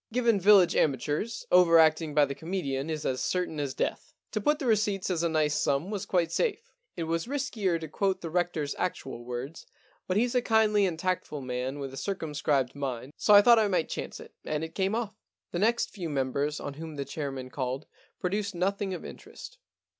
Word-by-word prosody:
Given 235 Hz, -3 st, +2 dB
village 190 Hz, -2 st, +6 dB
amateurs, 150 Hz, -, 0 dB
over 180 Hz, -2 st, +7 dB
acting 155 Hz, -1 st, +3 dB
by 150 Hz, -1 st, +6 dB
the 140 Hz, -, -4 dB
comedian 155 Hz, -4 st, -3 dB
is 155 Hz, -1 st, -3 dB
as 130 Hz, -1 st, -1 dB
certain 180 Hz, -4 st, -1 dB
as 140 Hz, -2 st, -3 dB
death. -, -, -3 dB, 0.2 s
To -, -, -2 dB
put 295 Hz, 0 st, +2 dB
the 290 Hz, -, -5 dB
receipts 210 Hz, -4 st, +1 dB
as 170 Hz, -2 st, 0 dB
a 170 Hz, -, +1 dB
nice 155 Hz, -2 st, +1 dB
sum 145 Hz, +7 st, 0 dB
was 205 Hz, -1 st, -4 dB
quite 170 Hz, -3 st, +1 dB
safe. 465 Hz, -, -1 dB, 0.3 s
It 170 Hz, -, -2 dB
was 165 Hz, +4 st, -2 dB
riskier 235 Hz, -11 st, -1 dB
to 160 Hz, -, -6 dB
quote 190 Hz, +4 st, -1 dB
the 165 Hz, -, -5 dB
Rector's 165 Hz, -4 st, -1 dB
actual 135 Hz, -9 st, -3 dB
words, 125 Hz, +6 st, -6 dB, 0.4 s
but 185 Hz, -, 0 dB
he's 240 Hz, +2 st, +2 dB
a 250 Hz, -, +3 dB
kindly 215 Hz, -3 st, +3 dB
and 170 Hz, -3 st, -3 dB
tactful 180 Hz, -4 st, -2 dB
man 130 Hz, +2 st, -3 dB
with 135 Hz, -2 st, -6 dB
a -, -, -8 dB
circumscribed 150 Hz, -8 st, -1 dB
mind, 135 Hz, -1 st, -5 dB
so 210 Hz, -, +5 dB
I 205 Hz, -, +9 dB
thought 235 Hz, 0 st, +7 dB
I 215 Hz, -, +3 dB
might 180 Hz, -5 st, 0 dB
chance -, -, -5 dB
it, -, -, -12 dB
and 155 Hz, 0 st, -2 dB
it 160 Hz, 0 st, -6 dB
came 195 Hz, +3 st, 0 dB
off.' 220 Hz, -2 st, -4 dB, 0.3 s
The 175 Hz, -, -2 dB
next 230 Hz, +4 st, +2 dB
few 180 Hz, -6 st, -5 dB
members 140 Hz, +1 st, -1 dB
on 145 Hz, -, -5 dB
whom 160 Hz, +1 st, -8 dB
the 140 Hz, -1 st, -4 dB
chair 140 Hz, 0 st, -4 dB
man 130 Hz, -1 st, -7 dB
called 130 Hz, +1 st, -3 dB, 0.3 s
produced 200 Hz, +1 st, -2 dB
nothing 195 Hz, +1 st, -1 dB
of -, -, -8 dB
interest. -, -, -11 dB
165 Hz, 205 wpm, -28 LUFS, 145-200 Hz, 0.4 s, I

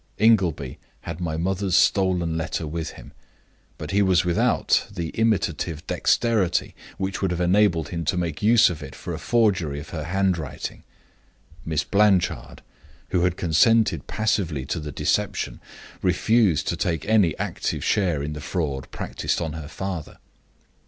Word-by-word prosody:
Ingleby 90 Hz, -, +2 dB, 0.2 s
had 85 Hz, +1 st, -6 dB
my 80 Hz, -2 st, -2 dB
mother's 95 Hz, +2 st, 0 dB
stolen 95 Hz, -4 st, +2 dB
letter 80 Hz, 0 st, -2 dB
with 80 Hz, +1 st, -4 dB
him; -, -, -13 dB, 0.7 s
but -, -, -6 dB
he 100 Hz, +1 st, +3 dB
was 95 Hz, -3 st, +3 dB
without 85 Hz, -1 st, +2 dB
the 85 Hz, -5 st, -4 dB
imitative 85 Hz, -8 st, -1 dB
dexterity 110 Hz, -7 st, +1 dB, 0.2 s
which 95 Hz, 0 st, -3 dB
would 95 Hz, -, +1 dB
have 90 Hz, 0 st, -2 dB
enabled 90 Hz, -2 st, +2 dB
him 85 Hz, -1 st, -3 dB
to 90 Hz, -, 0 dB
make 85 Hz, -4 st, -2 dB
use 110 Hz, -1 st, +5 dB
of 80 Hz, -3 st, -7 dB
it 70 Hz, -3 st, -9 dB
for -, -, -6 dB
a -, -, -5 dB
forgery 95 Hz, -11 st, +1 dB
of 75 Hz, -, -10 dB
her 80 Hz, -3 st, -5 dB
handwriting. 90 Hz, -4 st, -2 dB, 0.8 s
Miss 80 Hz, -1 st, -1 dB
Blanchard, 100 Hz, -3 st, +1 dB, 0.5 s
who 90 Hz, -1 st, +2 dB
had 90 Hz, 0 st, 0 dB
consented 110 Hz, +7 st, +3 dB
passively 95 Hz, -11 st, -1 dB
to 80 Hz, -, -3 dB
the 75 Hz, -1 st, -6 dB
deception, -, -, -1 dB, 0.4 s
refused 95 Hz, -3 st, +2 dB
to -, -, 0 dB
take 85 Hz, -3 st, -2 dB
any 105 Hz, -8 st, +3 dB
active -, -, -3 dB
share 85 Hz, -8 st, +1 dB
in 75 Hz, +1 st, -4 dB
the 75 Hz, -, -7 dB
fraud 70 Hz, -5 st, -3 dB
practiced -, -, -3 dB
on 80 Hz, -3 st, -3 dB
her 80 Hz, -2 st, -7 dB
father. 90 Hz, -1 st, -5 dB
90 Hz, 150 wpm, -24 LUFS, 80-100 Hz, 0.8 s, use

